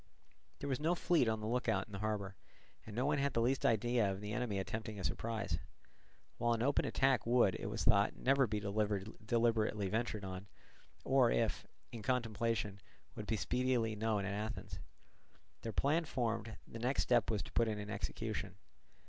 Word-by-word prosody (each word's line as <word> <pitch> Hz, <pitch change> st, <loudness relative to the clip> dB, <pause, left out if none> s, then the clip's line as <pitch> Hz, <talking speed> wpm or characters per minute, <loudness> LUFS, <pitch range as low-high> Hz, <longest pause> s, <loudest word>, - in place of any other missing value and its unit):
There 140 Hz, -, -5 dB
was 135 Hz, -3 st, 0 dB
no 165 Hz, +4 st, +2 dB
fleet 170 Hz, -7 st, +3 dB
on 110 Hz, -1 st, 0 dB
the 105 Hz, -, -3 dB
look 120 Hz, +1 st, 0 dB
out 100 Hz, -3 st, +1 dB
in -, -, -18 dB
the 100 Hz, -, -4 dB
harbour, 100 Hz, -2 st, -2 dB, 0.5 s
and 105 Hz, -, -7 dB
no 125 Hz, +3 st, +1 dB
one 145 Hz, 0 st, +2 dB
had 140 Hz, 0 st, +1 dB
the -, -, +1 dB
least 130 Hz, +3 st, +1 dB
idea 115 Hz, -1 st, +2 dB
of 95 Hz, -, -4 dB
the 105 Hz, +1 st, -5 dB
enemy 120 Hz, -4 st, -1 dB
attempting 110 Hz, +2 st, -4 dB
a -, -, -5 dB
surprise; 105 Hz, -8 st, -2 dB, 0.8 s
while 120 Hz, 0 st, +3 dB
an 115 Hz, 0 st, 0 dB
open 140 Hz, +2 st, +2 dB
attack 135 Hz, -3 st, +2 dB
would, 120 Hz, -6 st, +4 dB
it -, -, -4 dB
was 110 Hz, +2 st, -2 dB
thought, 100 Hz, -3 st, +4 dB
never 135 Hz, 0 st, +3 dB
be 105 Hz, 0 st, -1 dB
deliberately 105 Hz, +1 st, 0 dB
ventured 110 Hz, -1 st, -1 dB
on, 95 Hz, +1 st, -6 dB, 0.6 s
or, -, -, +4 dB
if -, -, 0 dB, 0.2 s
in 115 Hz, -, -7 dB
contemplation, 115 Hz, -4 st, -1 dB, 0.3 s
would 105 Hz, -, -7 dB
be 110 Hz, -, 0 dB
speedily 125 Hz, +1 st, +1 dB
known 105 Hz, -2 st, 0 dB
at 100 Hz, -, -2 dB
Athens. 100 Hz, -3 st, -4 dB, 0.8 s
Their 115 Hz, -, -3 dB
plan 155 Hz, +8 st, +2 dB
formed, 115 Hz, -5 st, -2 dB
the 115 Hz, -, -8 dB
next 125 Hz, +4 st, +1 dB
step 120 Hz, -2 st, +3 dB
was 105 Hz, -5 st, 0 dB
to -, -, -11 dB
put 115 Hz, -, +2 dB
it 110 Hz, -1 st, -1 dB
in 105 Hz, 0 st, -5 dB
execution. 105 Hz, -4 st, -3 dB
110 Hz, 185 wpm, -36 LUFS, 105-120 Hz, 0.8 s, would